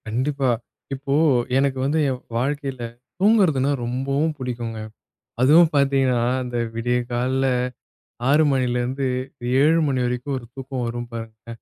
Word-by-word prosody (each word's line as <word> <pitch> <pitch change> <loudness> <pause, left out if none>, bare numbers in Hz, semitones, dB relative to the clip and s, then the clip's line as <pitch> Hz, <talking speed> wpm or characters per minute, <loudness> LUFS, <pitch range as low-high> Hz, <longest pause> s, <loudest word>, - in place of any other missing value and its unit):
கண்டிப்பா. 130 +4 0 0.4
இப்போ 135 +1 -3 0.4
எனக்கு 135 -1 +1
வந்து 150 +3 +1
என் 130 -1 -3 0.2
வாழ்க்கையில 135 0 -2 0.4
தூங்குறதுனா 180 - +4
ரொம்பவும் 135 +6 -1
புடிக்குங்க. 120 -4 -4 0.6
அதுவும் 155 +6 +6
பார்த்தீங்கன்னா, 135 -3 +3 0.2
அந்த 120 -1 -4 0.2
விடிய 120 +2 0
கால்ல 130 +2 0 0.8
6 150 +3 +5
மணிலிருந்து 130 +1 0 0.5
7 160 +3 +5
மணி 130 -3 0
வரைக்கும், 125 +3 -2
ஒரு 125 - -12
தூக்கம் 135 -2 -4
வரும் 120 0 -4
பாருங்க, 115 -2 -8
130 Hz, 120 wpm, -22 LUFS, 120-140 Hz, 0.8 s, அதுவும்